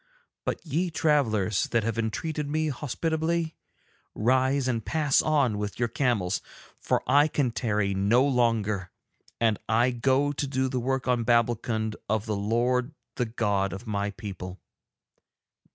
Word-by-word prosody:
But - - -3
ye 165 +4 0
travellers 120 - +1
that 115 -2 0
have 115 +1 -2
entreated 145 +7 -2
me 155 +1 0
hospitably, 160 +4 -1 0.6
rise 130 +3 +2
and 115 -3 -1
pass 150 0 +2
on 140 -9 +2
with 105 -1 -4
your 120 -1 0
camels, 105 -8 0 0.4
for - - 0
I 145 +2 +5
can 140 -5 0
tarry 105 -4 0
no 105 +7 +3
longer, 110 -7 +1 0.5
and 110 -3 +2
I 120 +3 +3
go 130 +4 +2
to 145 0 -3
do 130 -1 0
the 130 -1 -1
work 130 +1 -1
on 125 -2 +2
Babbulkund 115 -2 +1
of 110 0 0
the 110 -2 -1
Lord 120 +7 0 0.2
the 125 - +1
God 100 -4 0
of 95 +6 -7
my 100 -2 -1
people. 95 -3 -7
120 Hz, 145 wpm, -27 LUFS, 105-140 Hz, 0.6 s, I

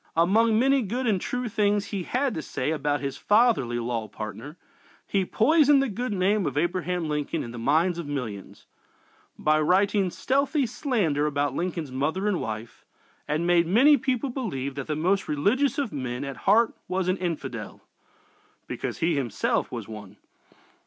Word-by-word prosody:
Among 215 +7 +3
many 270 +3 +3
good 245 +4 -3
and 205 -6 +1
true 250 0 -3
things 205 -2 +1
he 195 - -1
had 255 +8 -1
to 160 - -3
say 140 0 -3
about 145 -1 -1
his 140 -1 -4
fatherly 210 - +3
law 115 -2 -2
partner, 110 - -8 0.5
he 195 -2 0
poisoned 290 - +4
the 270 -1 +1
good 245 +4 -3
name 195 -1 +1
of 145 - -3
Abraham 175 +1 -1
Lincoln 150 -1 -2
in 120 - -7
the 120 - -7
minds 165 +8 +2
of 165 - -5
millions, 120 -9 -6 0.7
by 155 0 +2
writing 195 +4 +2
stealthy 275 - 0
slander 200 - 0
about 145 -2 -1
Lincoln's 170 -3 -3
mother 155 +10 -1
and 205 -4 0
wife, 110 +1 -6 0.4
and 155 +3 -1
made 175 -1 +3
many 260 - +6
people 260 0 -1
believe 140 - -3
that 140 -1 -6
the 150 - -1
most 185 +6 +1
religious 230 - +1
of 275 -7 -2
men 130 -2 -4
at 140 -1 -5
heart 225 +3 +5
was 185 0 -1
an 185 +1 +1
infidel 140 - -5 0.8
(because - - -5
he 165 0 +1
himself 125 -7 -1
was - - -6
one!) 105 -2 -10
175 Hz, 165 wpm, -26 LUFS, 145-220 Hz, 0.8 s, many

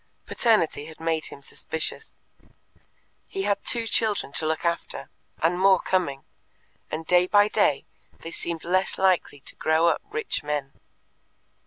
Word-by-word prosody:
Paternity 210 -11 +1
had 160 0 -12
made 160 -1 -1
him 140 - -12
suspicious. 160 - -5 1.1
He 390 0 -4
had 200 - 0
two 235 -1 +2
children 220 -8 +1
to 155 - +1
look 160 +2 -1
after, 170 0 -2 0.3
and 175 +2 +2
more 190 -1 +5
coming, 155 -8 -1 0.7
and 160 +1 -4
day 180 +1 +4
by 205 +1 +5
day 205 -10 +2 0.4
they 165 - -7
seemed 170 -1 -3
less 185 +2 +1
likely 185 -7 +1
to - - -7
grow 160 +2 +3
up - - 0
rich 445 0 -2
men. 145 -2 -3
170 Hz, 145 wpm, -25 LUFS, 160-200 Hz, 1.1 s, more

